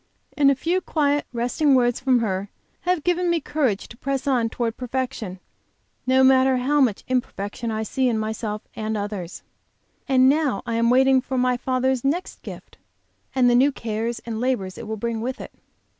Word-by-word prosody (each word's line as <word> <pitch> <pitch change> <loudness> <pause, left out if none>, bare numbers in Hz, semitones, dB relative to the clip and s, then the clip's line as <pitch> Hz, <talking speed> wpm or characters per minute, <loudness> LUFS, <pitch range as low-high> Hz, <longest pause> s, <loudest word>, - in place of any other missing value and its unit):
And 285 -2 +5
a 275 - +3
few 340 +8 0
quiet, 290 -4 0
resting 255 +4 +2
words 245 -2 +2
from 255 -2 +2
her 195 -2 -2 0.4
have 360 -5 +1
given 355 0 +1
me 340 -1 +2
courage 275 -9 -1
to - - -12
press 270 +2 -3
on 245 -5 +1
toward 230 -1 -2
perfection, 250 -6 -4 0.7
no 260 +1 +4
matter 260 0 +5
how 285 +4 +2
much 230 -7 +1
imperfection 235 -3 -3
I 220 0 -2
see 255 +4 0
in 230 - 0
myself 215 -1 -3
and 220 0 -2
others. 200 -4 -5 0.6
And 260 -1 +5
now 280 -6 +2
I 235 - -3
am 230 +1 +2
waiting 265 +1 +5
for 260 0 -4
my 250 0 +2
Father's 255 0 0
next 315 +7 -2
gift, - - -11 0.6
and 255 -2 +4
the 245 - +4
new 265 +4 +5
cares 230 -1 -3
and 225 -1 -4
labors 225 -8 -1
it 235 - -8
will 220 0 -4
bring 230 +1 -3
with 255 +3 -3
it. - - -8
250 Hz, 185 wpm, -23 LUFS, 225-265 Hz, 0.7 s, And